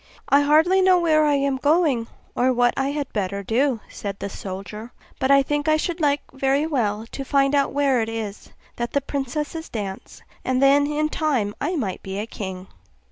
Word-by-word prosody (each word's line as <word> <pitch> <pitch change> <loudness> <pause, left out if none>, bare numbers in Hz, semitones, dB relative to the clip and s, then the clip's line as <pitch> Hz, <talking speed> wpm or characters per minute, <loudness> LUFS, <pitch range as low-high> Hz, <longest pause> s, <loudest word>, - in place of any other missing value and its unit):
'I 280 - +5
hardly 320 +6 +4
know 370 -1 +5
where 310 -3 +3
I 295 -1 +3
am 275 -1 0
going, 290 -5 +2 0.3
or 255 +1 +2
what 245 -1 +3
I 270 - 0
had 285 -1 -4
better 200 -1 -2
do,' 240 +2 +1
said 200 -1 -6
the 200 - -5
soldier; 200 +5 -7 0.3
'but 265 - 0
I 275 0 +6
think 295 +1 -2
I 310 0 +4
should 335 +2 -3
like 290 -1 +2
very 270 +2 +1
well 225 -8 -1
to 275 - -5
find 275 +1 +2
out 280 -1 +2
where 275 -4 +2
it 220 - -2
is 220 -3 -6 0.3
that 240 0 -3
the 280 - +2
princesses 295 +4 -4
dance, 200 -4 -6 0.2
and 255 0 0
then 280 +1 +5
in 300 +1 0
time 265 -11 0
I 320 +6 -1
might 215 - -3
be 190 0 -6
a 210 - -2
king. 190 -4 -7
275 Hz, 195 wpm, -23 LUFS, 225-295 Hz, 0.3 s, I